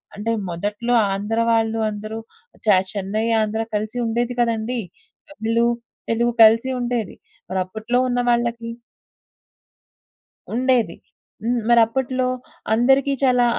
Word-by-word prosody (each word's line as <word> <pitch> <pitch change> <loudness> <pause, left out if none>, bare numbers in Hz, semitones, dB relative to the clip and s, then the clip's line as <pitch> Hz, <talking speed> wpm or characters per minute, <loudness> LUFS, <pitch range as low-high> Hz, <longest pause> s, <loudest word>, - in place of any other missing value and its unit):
అంటే 210 +3 -2 0.2
మొదట్లో 205 +7 -2 0.2
ఆంధ్ర 210 +3 -2
వాళ్ళు 225 0 +1
అందరూ 215 +1 -6 0.5
చె 210 - +6 0.2
చెన్నై, 205 +2 -2 0.2
ఆంధ్ర 215 +1 -1
కలిసుండేది 235 +3 -1
కదండీ! 235 +1 0 0.5
తమిళు, 230 -3 0 0.4
తెలుగు 235 +1 +2
కలిసి 230 +4 +5
ఉండేది. 240 -5 -2 0.3
మరప్పట్లో 210 +6 -2
ఉన్న 245 -1 0
వాళ్ళకి 235 -1 0 1.8
ఉండేది. 245 -7 +2 0.5
హ్మ్. 240 +1 +1
మరిప్పట్లో 255 +2 +3 0.5
అందరికీ 270 +4 +3
చాలా 250 -2 +4
230 Hz, 95 wpm, -21 LUFS, 215-245 Hz, 1.8 s, చె